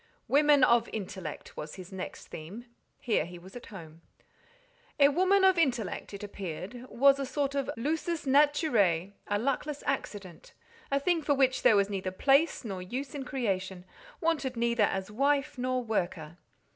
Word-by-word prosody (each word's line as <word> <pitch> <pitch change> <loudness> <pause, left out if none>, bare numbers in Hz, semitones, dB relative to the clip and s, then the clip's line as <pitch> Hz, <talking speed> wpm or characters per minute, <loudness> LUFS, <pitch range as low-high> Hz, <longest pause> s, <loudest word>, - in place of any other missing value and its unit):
"Women 290 -1 +5
of 235 -2 +4
intellect" 190 -6 -6
was 150 0 -7
his 185 0 -10
next 190 -1 -7
theme: 185 +10 -8 0.3
here 225 -9 0
he 175 +2 -9
was 185 +5 -14
at 245 - -9
home. 165 -5 -11 1.0
A 280 0 +7
"woman 375 +6 +3
of 380 -2 +5
intellect," 245 - -1
it 200 0 -8
appeared, 200 +5 -7
was 275 +2 +4
a - - -1
sort 280 0 -1
of 275 -1 -2
"lusus 320 +5 -2
naturae," 260 - +3 0.2
a 205 - +1
luckless 275 +5 -2
accident, 205 - -5 0.3
a 275 - +2
thing 335 +3 +1
for 290 -1 +1
which 260 -1 +2
there 220 - +6
was 200 -1 +3
neither 195 -2 -3
place 275 - +2
nor 195 -4 -4
use 255 +9 -5
in 280 -2 -5
creation, 190 -9 -3 0.3
wanted 300 -7 -1
neither 235 -2 +2
as 190 0 -3
wife 280 +3 0
nor 255 0 -1
worker. 175 -7 -3
240 Hz, 160 wpm, -29 LUFS, 190-280 Hz, 1.0 s, A